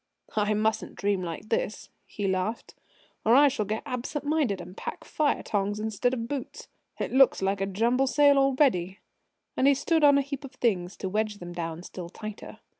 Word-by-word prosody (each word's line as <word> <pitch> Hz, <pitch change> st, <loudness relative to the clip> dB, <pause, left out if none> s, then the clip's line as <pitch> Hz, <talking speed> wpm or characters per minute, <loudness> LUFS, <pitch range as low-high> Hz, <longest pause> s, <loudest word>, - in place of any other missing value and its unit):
"I 210 Hz, 0 st, +2 dB
mustn't 220 Hz, +1 st, -1 dB
dream 200 Hz, -2 st, 0 dB
like 170 Hz, +4 st, -6 dB
this," 215 Hz, -1 st, -2 dB, 0.2 s
he 205 Hz, -2 st, -3 dB
laughed, 190 Hz, +4 st, -2 dB, 0.5 s
"or 225 Hz, +2 st, +5 dB
I 285 Hz, +1 st, +7 dB
shall 260 Hz, -6 st, -2 dB
get 215 Hz, +2 st, -2 dB
absent 255 Hz, +4 st, -4 dB
minded 290 Hz, -10 st, +1 dB
and 180 Hz, -, -10 dB
pack -, -, -6 dB
fire 300 Hz, -2 st, 0 dB
tongs 205 Hz, 0 st, -1 dB
instead 220 Hz, +3 st, 0 dB
of 230 Hz, -2 st, -4 dB
boots. 275 Hz, -1 st, -6 dB, 0.3 s
It -, -, -2 dB
looks 265 Hz, 0 st, +5 dB
like 195 Hz, 0 st, 0 dB
a 195 Hz, -, 0 dB
jumble 235 Hz, +7 st, +1 dB
sale 285 Hz, 0 st, +5 dB
already!" 260 Hz, -, +2 dB, 0.6 s
And 265 Hz, -, +3 dB
he 280 Hz, -, +6 dB
stood 320 Hz, +3 st, +1 dB
on 285 Hz, -1 st, +7 dB
a -, -, +4 dB
heap 280 Hz, 0 st, -6 dB
of 275 Hz, 0 st, -9 dB
things 195 Hz, -7 st, -1 dB
to 190 Hz, -, -4 dB
wedge 210 Hz, +2 st, -1 dB
them 175 Hz, -2 st, -8 dB
down 165 Hz, -1 st, -5 dB
still 180 Hz, -2 st, -8 dB
tighter. 215 Hz, +3 st, -9 dB
220 Hz, 190 wpm, -27 LUFS, 195-270 Hz, 0.6 s, I